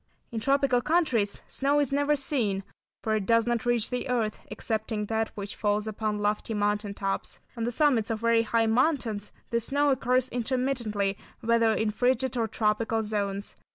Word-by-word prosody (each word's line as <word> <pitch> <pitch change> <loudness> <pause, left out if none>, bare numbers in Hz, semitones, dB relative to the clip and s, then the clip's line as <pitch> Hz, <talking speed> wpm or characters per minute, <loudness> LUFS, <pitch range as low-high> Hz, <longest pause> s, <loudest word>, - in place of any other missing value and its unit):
In 230 - -2
tropical 275 +1 +2
countries 255 -10 +1
snow 280 +2 +1
is 285 -3 +1
never 285 +1 +2
seen, 235 -9 0 0.4
for 220 -1 +1
it 210 -3 -2
does 230 -1 +4
not 240 0 -1
reach 240 -1 +1
the 250 +1 -2
earth, 225 -4 -1
excepting 220 -1 -2
that 220 +1 -1
which 200 -1 -5
falls 210 0 0
upon 215 -1 -2
lofty 210 +2 -1
mountain 205 0 0
tops. 195 -1 -3 0.2
On 230 -1 -2
the 240 - -1
summits 245 -4 +2
of 225 -1 -2
very 230 0 +4
high 230 0 +1
mountains 225 -3 +1 0.2
the 235 - +2
snow 285 +5 +1
occurs 255 -1 +2
intermittently 235 -5 -1 0.2
whether 230 0 +3
in 220 -1 0
frigid 255 +3 +1
or 230 -2 +1
tropical 220 +1 0
zones. 200 -1 -3
230 Hz, 170 wpm, -27 LUFS, 210-250 Hz, 0.4 s, does